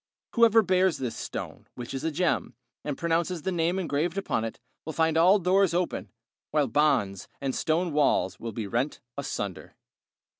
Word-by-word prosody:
Whoever 230 Hz, -1 st, +6 dB
bears 185 Hz, -2 st, +2 dB
this 125 Hz, -3 st, -3 dB
stone, -, -, -6 dB
which 125 Hz, +1 st, -7 dB
is 135 Hz, -, -4 dB
a 160 Hz, -, +1 dB
gem, 160 Hz, -6 st, 0 dB, 0.3 s
and 145 Hz, -2 st, -3 dB
pronounces 170 Hz, 0 st, 0 dB
the 190 Hz, -, -1 dB
name 170 Hz, +1 st, +1 dB
engraved 170 Hz, 0 st, -1 dB
upon 195 Hz, -12 st, -1 dB
it, 115 Hz, -, -5 dB, 0.2 s
will 160 Hz, -, -5 dB
find 160 Hz, 0 st, +2 dB
all 180 Hz, +5 st, +6 dB
doors 185 Hz, -1 st, +3 dB
open, 180 Hz, 0 st, -1 dB, 0.4 s
while 150 Hz, -1 st, +2 dB
bonds 125 Hz, -7 st, +1 dB
and 135 Hz, -1 st, -2 dB
stone 165 Hz, +3 st, 0 dB
walls 140 Hz, -10 st, +2 dB
will 115 Hz, -, -5 dB
be 110 Hz, 0 st, -4 dB
rent 120 Hz, +8 st, -1 dB, 0.2 s
asunder. 105 Hz, -9 st, -5 dB
160 Hz, 165 wpm, -27 LUFS, 130-180 Hz, 0.4 s, Whoever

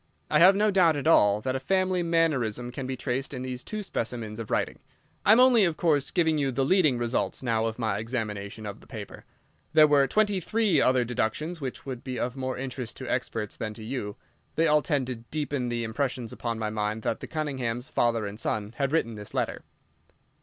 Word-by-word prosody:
I -, -, +5 dB
have 185 Hz, +3 st, +8 dB
no 210 Hz, +1 st, +3 dB
doubt 175 Hz, -5 st, +4 dB
at 145 Hz, -, -3 dB
all 105 Hz, -10 st, +5 dB
that 130 Hz, +3 st, -1 dB
a -, -, 0 dB
family 185 Hz, +5 st, +1 dB
mannerism 135 Hz, -9 st, +1 dB
can 130 Hz, +1 st, -5 dB
be 130 Hz, 0 st, -3 dB
traced 135 Hz, +2 st, -3 dB
in 125 Hz, -, -5 dB
these 130 Hz, -1 st, -5 dB
two 215 Hz, -1 st, -5 dB
specimens 115 Hz, -, -4 dB
of 115 Hz, -, -6 dB
writing. -, -, -1 dB, 0.5 s
I -, -, +8 dB
am 225 Hz, -, +7 dB
only, 250 Hz, -4 st, +6 dB
of 170 Hz, -4 st, +1 dB
course, 150 Hz, -5 st, +2 dB
giving 160 Hz, -3 st, +2 dB
you 135 Hz, -2 st, +1 dB
the 135 Hz, +1 st, 0 dB
leading 155 Hz, -6 st, +4 dB
results 120 Hz, +2 st, -1 dB
now 115 Hz, -2 st, +1 dB
of 115 Hz, -, -4 dB
my 110 Hz, -4 st, -1 dB
examination 110 Hz, -2 st, -4 dB
of 100 Hz, -1 st, -7 dB
the -, -, -18 dB
paper. -, -, -9 dB, 0.5 s
There 155 Hz, -1 st, +8 dB
were 145 Hz, -2 st, +4 dB
twenty 205 Hz, +4 st, +2 dB
three 215 Hz, +2 st, +2 dB
other 130 Hz, -1 st, +3 dB
deductions 125 Hz, +8 st, -2 dB
which 135 Hz, +4 st, -5 dB
would 130 Hz, -3 st, -6 dB
be 130 Hz, -2 st, -4 dB
of 125 Hz, +1 st, -2 dB
more 130 Hz, -1 st, -3 dB
interest 125 Hz, -3 st, -5 dB
to 130 Hz, -, -7 dB
experts 115 Hz, -4 st, -2 dB
than 110 Hz, -1 st, -5 dB
to 110 Hz, -, -9 dB
you. 110 Hz, -3 st, -4 dB, 0.4 s
They 165 Hz, -, +3 dB
all 150 Hz, -1 st, +4 dB
tend 145 Hz, -5 st, 0 dB
to 125 Hz, -1 st, -4 dB
deepen 140 Hz, +1 st, -3 dB
the 120 Hz, 0 st, -2 dB
impression 125 Hz, +1 st, -2 dB
upon 115 Hz, -1 st, -3 dB
my 110 Hz, -1 st, -2 dB
mind 105 Hz, +1 st, -2 dB
that -, -, -1 dB
the -, -, -7 dB
Cunninghams, 130 Hz, -5 st, -3 dB
father 115 Hz, -2 st, +1 dB
and 100 Hz, +1 st, -6 dB
son, 105 Hz, -1 st, -2 dB
had 140 Hz, -1 st, 0 dB
written 135 Hz, -8 st, +1 dB
this 105 Hz, -1 st, -9 dB
letter. -, -, -1 dB
130 Hz, 215 wpm, -27 LUFS, 115-155 Hz, 0.5 s, have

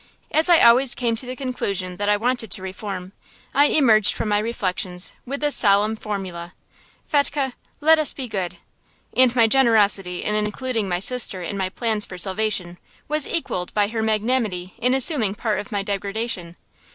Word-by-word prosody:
As 315 Hz, +3 st, +2 dB
I 345 Hz, -, +6 dB
always 245 Hz, +2 st, +5 dB
came 235 Hz, -2 st, -1 dB
to 250 Hz, -, -2 dB
the 255 Hz, -, -5 dB
conclusion 200 Hz, -9 st, -3 dB
that 205 Hz, 0 st, -1 dB
I 205 Hz, -, +3 dB
wanted 240 Hz, 0 st, -1 dB
to 185 Hz, -, -3 dB
reform, 190 Hz, -1 st, -6 dB, 0.4 s
I 285 Hz, +2 st, +5 dB
emerged 225 Hz, -9 st, +4 dB
from 215 Hz, -, -3 dB
my 205 Hz, 0 st, +2 dB
reflections 185 Hz, -5 st, -3 dB
with 280 Hz, +3 st, -5 dB
this 295 Hz, -1 st, +2 dB
solemn 210 Hz, +1 st, +3 dB
formula: 185 Hz, -5 st, -6 dB, 0.5 s
"Fetchke, 285 Hz, -3 st, 0 dB, 0.3 s
let 320 Hz, +1 st, +5 dB
us 305 Hz, -, +4 dB
be 265 Hz, -3 st, -6 dB
good." 185 Hz, -5 st, -4 dB, 0.6 s
And 255 Hz, -1 st, +4 dB
my 230 Hz, -2 st, +5 dB
generosity 210 Hz, -7 st, +2 dB
in 210 Hz, -, -2 dB
including 215 Hz, +1 st, -2 dB
my 175 Hz, -, 0 dB
sister 195 Hz, -2 st, +1 dB
in 175 Hz, -, -5 dB
my 190 Hz, -1 st, -2 dB
plans 215 Hz, 0 st, -1 dB
for 180 Hz, -, -9 dB
salvation 190 Hz, -2 st, +1 dB, 0.3 s
was 300 Hz, 0 st, -1 dB
equalled 185 Hz, -, -3 dB
by 205 Hz, -1 st, +2 dB
her 225 Hz, 0 st, -3 dB
magnanimity 215 Hz, -4 st, -1 dB
in 250 Hz, +2 st, +1 dB
assuming 255 Hz, -, +3 dB
part 210 Hz, -2 st, -2 dB
of 205 Hz, -, -8 dB
my 200 Hz, -2 st, -2 dB
degradation. 200 Hz, -3 st, -4 dB
215 Hz, 175 wpm, -22 LUFS, 195-250 Hz, 0.6 s, I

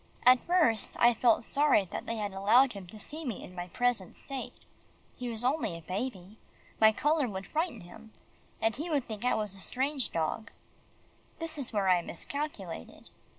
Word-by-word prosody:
At 250 Hz, 0 st, +8 dB
first, 320 Hz, -11 st, +2 dB
I 240 Hz, 0 st, +6 dB
felt 230 Hz, 0 st, +3 dB
sorry 280 Hz, -6 st, +3 dB
that -, -, -5 dB
they 230 Hz, -, -2 dB
had 210 Hz, -2 st, -3 dB
allowed 230 Hz, +7 st, +5 dB
him 195 Hz, -3 st, -9 dB
to 215 Hz, -, -11 dB
see 310 Hz, +9 st, -3 dB
me 240 Hz, -9 st, -4 dB
in 180 Hz, -, -10 dB
my 175 Hz, 0 st, -5 dB
present 245 Hz, -1 st, 0 dB
state. 270 Hz, -2 st, -6 dB, 0.6 s
He 250 Hz, -1 st, -4 dB
was 230 Hz, 0 st, +1 dB
only 255 Hz, -, 0 dB
a 165 Hz, -, -12 dB
baby. 195 Hz, +2 st, -5 dB, 0.4 s
My 220 Hz, 0 st, +7 dB
colour 295 Hz, +4 st, +1 dB
would 190 Hz, -1 st, -5 dB
frighten 315 Hz, -, -2 dB
him, 175 Hz, +6 st, -13 dB, 0.5 s
and 225 Hz, 0 st, +1 dB
he 315 Hz, +6 st, -4 dB
would 285 Hz, -5 st, +1 dB
think 215 Hz, -1 st, -6 dB
I 250 Hz, -, +3 dB
was 210 Hz, -3 st, -2 dB
a 195 Hz, -, -9 dB
strange 265 Hz, -, -1 dB
dog. 165 Hz, +7 st, -2 dB, 0.9 s
That 330 Hz, -1 st, -4 dB
is 280 Hz, -5 st, -3 dB
where 205 Hz, -3 st, +1 dB
I 180 Hz, -1 st, +5 dB
miscalculated. 195 Hz, -, -6 dB
225 Hz, 185 wpm, -30 LUFS, 195-270 Hz, 0.9 s, At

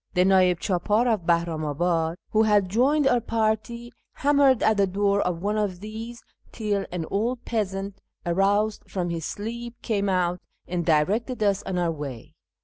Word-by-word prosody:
The 180 Hz, 0 st, +4 dB
nd'ih 185 Hz, -2 st, +4 dB
chApdr 205 Hz, +6 st, +1 dB
of 180 Hz, -6 st, -4 dB
Bahri'imiibi'id, 165 Hz, 0 st, 0 dB, 0.2 s
who 215 Hz, -, +3 dB
had 205 Hz, -3 st, +3 dB
joined 270 Hz, +8 st, +2 dB
our 245 Hz, -3 st, +3 dB
party, 230 Hz, +1 st, -1 dB, 0.2 s
hammered 280 Hz, -3 st, +3 dB
at 220 Hz, -1 st, +3 dB
the 200 Hz, -1 st, +3 dB
door 200 Hz, +1 st, +1 dB
of 175 Hz, -1 st, -2 dB
one 210 Hz, +1 st, 0 dB
of 195 Hz, -4 st, -2 dB
these 220 Hz, +3 st, -8 dB, 0.3 s
till 205 Hz, -3 st, -2 dB
an 175 Hz, -2 st, -3 dB
old 235 Hz, +5 st, -1 dB
peasant, 195 Hz, -3 st, -3 dB, 0.2 s
aroused 200 Hz, +4 st, +1 dB
from 175 Hz, -3 st, -2 dB
his 165 Hz, -2 st, -4 dB
sleep, 235 Hz, +3 st, -6 dB
came 200 Hz, -3 st, 0 dB
out, 180 Hz, -1 st, 0 dB, 0.3 s
and 175 Hz, -1 st, -2 dB
directed 205 Hz, -, +1 dB
us 200 Hz, -1 st, +2 dB
on 185 Hz, -, -2 dB
our 175 Hz, -2 st, +1 dB
way. 145 Hz, -2 st, -7 dB
200 Hz, 160 wpm, -25 LUFS, 175-220 Hz, 0.3 s, The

